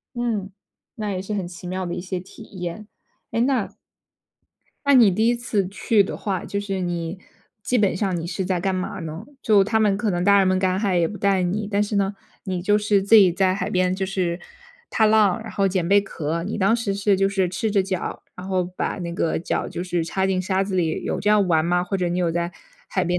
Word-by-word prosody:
嗯， 220 -5 -2 0.4
那 215 -4 -4
也 185 - -3
是 195 +3 -4
很 195 -3 -2
奇 175 0 -10
妙 185 +1 -3
的 175 - -3
一 - - -4
些 185 0 -4
体 190 +4 -13 0.2
验。 180 +5 -5 0.4
诶， 230 - 0
那 255 -5 0 1.1
那 280 - +5
你 235 -6 +7
第 220 +5 +1
一 240 - +3
次 230 -5 -1
去 205 +1 +2
的 - - -5
话， 195 -3 -3
就 200 - -3
是 195 -2 -3
你 175 0 -3 0.4
基 250 - +1
本 200 -5 +2
上 190 -1 -1
你 165 - -5
是 185 +2 -3
在 180 -1 -1
干 190 0 0
嘛 185 +1 -3
呢？ 165 +5 -6 0.2
就 205 -3 +5
他 220 +2 +1
们 205 -2 +3
可 210 0 -1
能 175 -1 -1
大 200 +2 +5
人 195 - +4
们 185 0 +2
赶 185 0 +1
海 195 -3 +1
也 165 - +2
不 210 - -7
带 195 -2 +2
你， 200 +4 -1
但 205 0 +2
是 210 0 -2
呢， 200 0 +1 0.3
你 185 -2 -2
就 205 +2 +3
是 205 -1 +2
自 200 +3 +3
己 190 -5 +7
在 185 +1 +2
海 195 +1 -3
边 185 -1 +1
就 190 0 -2
是 185 -3 -1 0.5
踏 220 - +3
浪， 215 -2 +4
然 220 - -8
后 200 -1 +1
捡 185 -3 0
贝 200 +1 +6
壳， 165 -3 -3
你 210 +3 -4
当 200 +3 +3
时 225 -4 -2
是 200 0 +2
就 195 +1 +2
是 195 -2 0
赤 200 +5 -2
着 200 -2 +3
脚， 185 -2 -4
然 180 - -8
后 185 -1 +1
把 180 +2 -4
那 170 -1 -4
个 165 -1 0
脚 165 - -2
就 175 - -5
是 175 -2 -1
插 190 +3 -1
进 190 -1 0
沙 190 +1 0
子 195 -1 -3
里， 165 -3 0
有 - - -2
这 210 - +1
样 210 -2 +4
玩 160 -2 +3
吗？ 175 +1 +2
或 180 +2 -2
者 180 -2 0
你 175 +1 -1
有 175 -2 +1
在 170 +1 -2 0.4
海 185 - 0
边 175 +1 0
190 Hz, 265 characters per minute, -23 LUFS, 180-205 Hz, 1.1 s, 你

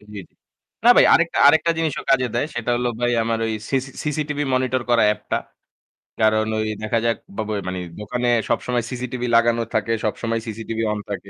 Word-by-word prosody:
জি, - - -20
জি। 100 - -5 0.6
না 240 - +8
ভাই - - +7
আরেকটা 170 0 +2
আরেকটা 160 +3 +4
জিনিসও 160 -3 -1
কাজে 130 -2 +3
দেয় 120 - 0
সেটা 120 0 -2
হলো 120 0 0
ভাই 120 0 +1
আমার 115 0 -1
ওই 110 - -2 0.2
সিসি 135 0 -1
CCTV 150 -1 -2 0.2
monitor 130 0 0
করা 115 -2 +4
app - - -19
টা। - - +3 0.8
কারণ 110 0 +3
ওই 110 - -1 0.2
দেখা 110 +2 0
যাক 115 -1 +1 0.2
বাবয় 110 -2 -2
মানে 90 0 -3 0.2
দোকানে 120 +3 -2 0.2
সবসময় 120 -1 0
CCTV 125 0 -5
লাগানো 115 0 +3
থাকে, 110 +1 +1
সবসময় 115 +2 -1
CCTV 115 0 -5
on 105 - -4
থাকে। 100 0 -6
120 Hz, 185 wpm, -21 LUFS, 110-130 Hz, 0.8 s, না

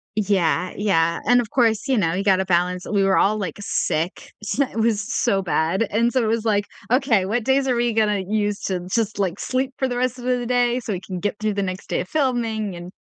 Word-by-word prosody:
Yeah, 190 -4 +1
yeah, 170 -5 +1
and, 245 +2 +5
of 225 - -5
course, 230 0 +1
you 265 - +3
know, 165 -7 +1
you 185 - -1
gotta 190 -1 +3
balance 180 0 0
We 200 -2 +1
were 195 0 +3
all, 215 +2 +3
like, 200 -4 -4
sick, 170 -3 -2
so, 275 +6 0
it 250 - -11
was 220 -2 +2
so 210 -2 0
bad, 175 +3 0
and 235 +3 +1
so 255 - +2
it 225 - 0
was 225 0 0
like, 205 -2 +1 0.3
"Okay, 250 -7 +3
what 220 +4 -1
days 265 +2 +2
are 255 - +2
we 240 -1 0
gonna 210 -3 +2
use 210 -1 -1
to 185 -2 -1
just, 225 -3 0
like, 190 -1 -1
sleep 260 +1 -1
for 265 - 0
the 245 - -3
rest 250 0 -1
of 245 - -9
the 250 -1 +1
d 240 - -4
day, 245 0 +1
so 220 -3 -4
we 180 - -3
can 185 -1 -6
get 205 +3 -2
through 215 -1 0
the 200 - -1
next 185 0 -5
day - - -1
of - - -5
filming." 230 -8 -1
And, 175 +2 -9
215 Hz, 250 wpm, -22 LUFS, 190-240 Hz, 0.3 s, and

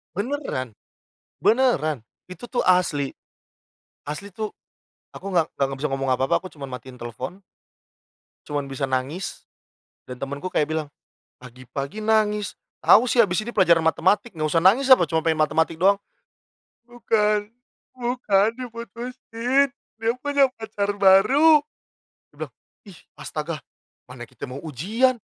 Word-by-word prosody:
Beneran. 200 - -3 0.7
Beneran! 165 - +2 0.3
Itu 180 +6 -9
tuh 245 - -1
asli. 170 -7 +2 1.0
Asli 195 +6 -6
tuh 215 +1 -3 0.6
aku - - -12
nggak 170 -3 +4
nggak 140 - +2
nggak 135 0 -5
bisa 150 - 0
ngomong 135 0 -2
apa-apa, 130 +1 +2
aku 185 - -9
cuman 140 -3 -8
matiin 125 0 -14
telepon 125 - -7 1.1
cuman 145 -1 -2
bisa 135 +1 -2
nangis. 135 +8 -3 0.6
Dan 125 -1 -8
temenku 140 +7 -5
kayak 150 - +1
bilang, 155 -2 -2 0.5
"Pagi-pagi 130 - -7
nangis. 210 -1 +1 0.3
Tahu 235 +4 +6
sih, 235 - +5
habis 180 -1 0
ini 220 - -6
pelajaran 170 -6 +4
matematik, 185 +6 +1
nggak 155 -1 -1
usah 165 +2 +2
nangis 220 +10 +5
apa? 175 -10 +3
Cuman 160 -1 0
pengen 160 -1 +1
matematik 160 +2 +1
doang." 200 +3 +5 0.9
"Bukan, 210 -3 0 0.5
bukan, 240 -5 +2
diputusin. 240 +2 -2 0.3
Dia 225 +1 +2
punya 285 -1 +3
pacar 205 -2 -2
baru." 215 +12 +6 0.7
Dia - - -24
bilang. - - -20 0.4
"Ih 180 - -13 0.2
astaga. - - -5 0.5
Mana - - -8
kita - - -9
mau 130 +2 -6
ujian. 210 - +1
190 Hz, 135 wpm, -23 LUFS, 145-225 Hz, 1.1 s, Tahu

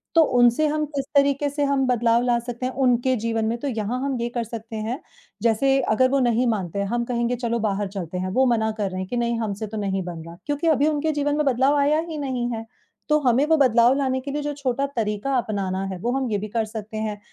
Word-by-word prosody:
तो 330 - +8 0.2
उनसे 245 +5 +4
हम 305 0 0
किस 275 -1 -1
तरीक़े 280 +1 +3
से 290 +1 -2
हम 275 -1 +2
बदलाव 235 -1 +3
ला 240 -1 +2
सकते 240 +1 -5
हैं 255 - -1
उनके 250 +1 +3
जीवन 225 -1 -1
में 230 +2 -1
तो 285 - -3
यहाँ 230 0 -2
हम 275 -2 -1
ये 235 - -1
कर 240 0 -2
सकते 225 0 -8
हैं, 225 +6 -3 0.4
जैसे 235 +5 +3
अगर 255 +2 +2
वो 275 - +3
नहीं 245 -1 +2
मानते 200 -4 -1
हम 240 0 +1
कहेंगे 240 0 0
चलो 235 -1 -2
बाहर 205 -2 -1
चलते 185 -3 -5
हैं 185 +1 -2
वो 265 - +5
मना 220 -3 +2
कर 205 -2 -1
रहे 185 0 -5
हैं 185 - -5
कि 245 - -2
नहीं 235 -1 0
हमसे 215 -1 -3
तो 215 +1 -6
नहीं 195 -2 -1
बन 170 -2 -7
रहा, 170 0 -10
क्योंकि 290 +3 -1
अभी 300 -2 +3
उनके 310 +1 +1
जीवन 290 0 0
में 300 - +1
बदलाव 270 +2 +3
आया 295 +2 +3
ही 315 - -5
नहीं 255 -4 -2
है। 225 0 -5 0.4
तो 300 0 +4
हमें 260 0 +3
वो 320 - +5
बदलाव 245 -3 +5
लाने 260 -2 0
के 280 +2 -5
लिए 295 +1 -2
जो 290 0 -3
छोटा 275 -1 -1
तरीक़ा 220 +4 -1
अपनाना 195 -4 -2
है 185 - -5
वो 240 +5 -1
हम 265 -2 -1
ये 205 - +1
भी 210 +2 -4
कर 225 +1 -1
सकते 215 0 -7
हैं, 215 -1 -3
240 Hz, 255 wpm, -23 LUFS, 220-275 Hz, 0.4 s, तो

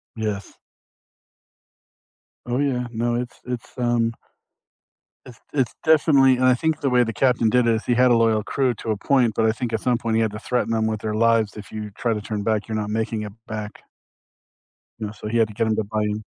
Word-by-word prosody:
Yes. 105 -3 -4 1.9
Oh 120 +1 -1
yeah, 130 -4 0
no, 120 +1 -1
it's 120 0 -4
it's, 125 -1 -6
um 120 -2 +1 1.1
it's 120 -3 -13
it's 130 -5 0
definitely 145 -4 +5
and 130 - +2
I 130 -1 +5
think 160 +3 -1
the 140 - +1
way 125 -1 +4
the 115 -1 -3
captain 125 -2 +2
did 125 0 +3
it, 115 - +4
is 110 - -4
he 120 - +2
had 125 +1 +4
a - - +6
loyal 110 -2 +2
crew 130 +1 0
to 110 - -7
a 105 - -1
point, 125 +1 +2
but 110 - +2
I 110 - +4
think 115 +1 -4
at 110 - +1
some 125 -2 +1
point 115 -1 -2
he 115 - +3
had 110 -2 +1
to 105 - -7
threaten 120 -1 -1
'em 110 0 +1
with 110 -1 -2
their 105 -1 -2
lives. 115 -1 +2
"If 105 0 -10
you 105 -1 -6
try 115 +3 -1
to 105 - -4
turn 105 0 -4
back, 110 0 0
you're 110 - -3
not 105 -1 -2
making 110 0 -2
it 105 -1 -6
back." 105 -2 -6 1.2
Yeah, 105 -1 -4
so 105 - -8
he 115 +2 0
had 115 - +4
to 105 - -11
get 110 +2 0
'em 110 - +1
to 110 - +1
buy 105 +1 -2
in. 105 +1 -2
115 Hz, 230 wpm, -23 LUFS, 110-125 Hz, 1.9 s, a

